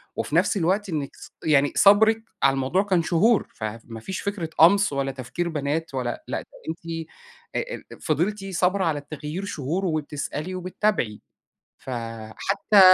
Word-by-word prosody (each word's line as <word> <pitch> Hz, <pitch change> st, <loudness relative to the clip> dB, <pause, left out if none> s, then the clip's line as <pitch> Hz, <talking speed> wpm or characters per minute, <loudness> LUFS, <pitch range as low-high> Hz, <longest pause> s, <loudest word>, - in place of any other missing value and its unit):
وفي -, -, -2 dB
نفْس 205 Hz, -, +3 dB
الوقت 190 Hz, +4 st, +1 dB
إنِّك 150 Hz, -4 st, -3 dB
ص -, -, -12 dB
يعني 145 Hz, -2 st, +4 dB
صبْرِك 220 Hz, +2 st, +6 dB, 0.2 s
على 135 Hz, 0 st, +6 dB
الموضوع 135 Hz, +9 st, +1 dB
كان 185 Hz, -5 st, +2 dB
شهور، 205 Hz, +7 st, +3 dB
فما 115 Hz, +1 st, -6 dB
فيش 185 Hz, +11 st, -5 dB
فكرة 200 Hz, -5 st, -3 dB
قَمْص 200 Hz, +1 st, +6 dB
ولا 135 Hz, -1 st, 0 dB
تفكير 130 Hz, +7 st, -3 dB
بنات، 150 Hz, +1 st, -2 dB
ولا 125 Hz, -2 st, -3 dB
لأ -, -, -2 dB
ده -, -, -15 dB, 0.2 s
أنتِ 165 Hz, 0 st, -5 dB, 0.5 s
أ -, -, -2 dB, 0.2 s
أ -, -, -12 dB
فضلتِ 195 Hz, +6 st, 0 dB
صابرة 190 Hz, 0 st, +1 dB
على 150 Hz, -3 st, +1 dB
التغيير 155 Hz, +5 st, -6 dB
شهور، 170 Hz, +3 st, -2 dB
وبتسألي 155 Hz, +2 st, -3 dB
وبتتابعي، 185 Hz, -, -1 dB, 0.6 s
فحتى 120 Hz, -, 0 dB
165 Hz, 150 wpm, -25 LUFS, 140-195 Hz, 0.6 s, صبْرِك